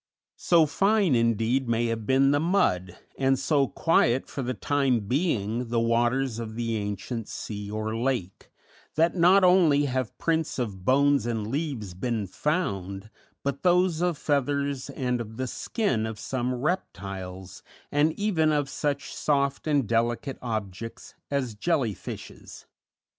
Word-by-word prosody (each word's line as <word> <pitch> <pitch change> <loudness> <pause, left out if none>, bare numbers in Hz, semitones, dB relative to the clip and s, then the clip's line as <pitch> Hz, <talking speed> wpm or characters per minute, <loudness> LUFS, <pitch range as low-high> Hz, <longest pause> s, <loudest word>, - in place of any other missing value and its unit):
So 170 -3 +4
fine, 195 +1 +2
indeed, 115 +2 +1
may 115 0 +1
have 115 -2 -3
been 135 +1 +4
the 145 - +3
mud, 145 - +1 0.2
and 135 0 +3
so 140 +1 +2
quiet 130 -4 +2
for 140 - -5
the 130 0 -2
time 135 -5 +1
being 120 - -1
the 120 0 +1
waters 120 +1 +1
of 110 -1 -6
the 115 -1 -2
ancient 105 +2 -4
sea 105 -1 -6
or 110 +1 -3
lake, 115 -6 -2 0.5
that 165 +3 +3
not 185 +3 +5
only 170 -6 +5
have 130 -4 -2
prints 160 -2 0
of 105 -7 -4
bones 140 +2 +3
and 115 -3 -2
leaves 130 - -3
been 110 +3 -2
found, 100 - -2 0.3
but 140 0 -2
those 180 -2 +3
of 175 -3 +1
feathers 140 -2 -1
and 125 -2 -1
of 110 -1 -8
the 130 - -1
skin 130 - -1
of 110 -1 -6
some 125 +2 -2
reptiles, 95 - -4 0.3
and 145 +2 +3
even 170 -7 +1
of 145 -2 0
such 145 -2 -2
soft 140 0 0
and 145 -6 +2
delicate 120 +4 0
objects 110 -2 -5 0.2
as 135 -5 -1
jelly 125 -1 0
fishes. - - -9
130 Hz, 145 wpm, -26 LUFS, 110-145 Hz, 0.5 s, not